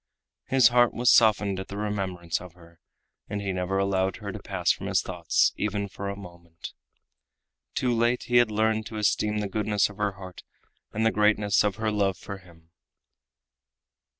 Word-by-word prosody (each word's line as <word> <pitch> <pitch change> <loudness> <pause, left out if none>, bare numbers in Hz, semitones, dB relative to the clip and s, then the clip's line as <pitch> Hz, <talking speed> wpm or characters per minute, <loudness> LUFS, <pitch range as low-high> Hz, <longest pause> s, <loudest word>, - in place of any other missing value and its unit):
His 130 -2 +5
heart 120 -1 +3
was 120 +1 +4
softened 105 -4 +3
at 95 - -6
the 100 - -7
remembrance 95 -6 -3
of 90 -2 -11
her, 85 -1 -19 0.5
and 105 - -3
he 100 -2 -3
never 90 +1 -2
allowed 95 -1 0
her - - -6
to - - -7
pass - - 0
from - - -4
his - - +1
thoughts - - +1
even 100 -1 -2
for 100 0 -6
a 100 - -4
moment. 85 -3 -11 1.0
Too 125 -2 +1
late 120 +1 +1
had 120 -1 +3
he 105 - -6
learned 110 0 +1
to 110 - -7
esteem 105 0 +1
the 105 - -2
goodness 105 0 0
of 105 - -16
her 105 -1 -1
heart 95 -2 -11 0.5
and 110 +1 -1
the 110 - +4
greatness 105 -1 +2
of 105 -2 0
her 110 -1 -1
love 100 -3 0
for 100 -1 -8
him. 85 -2 -20
100 Hz, 180 wpm, -26 LUFS, 95-110 Hz, 1.0 s, His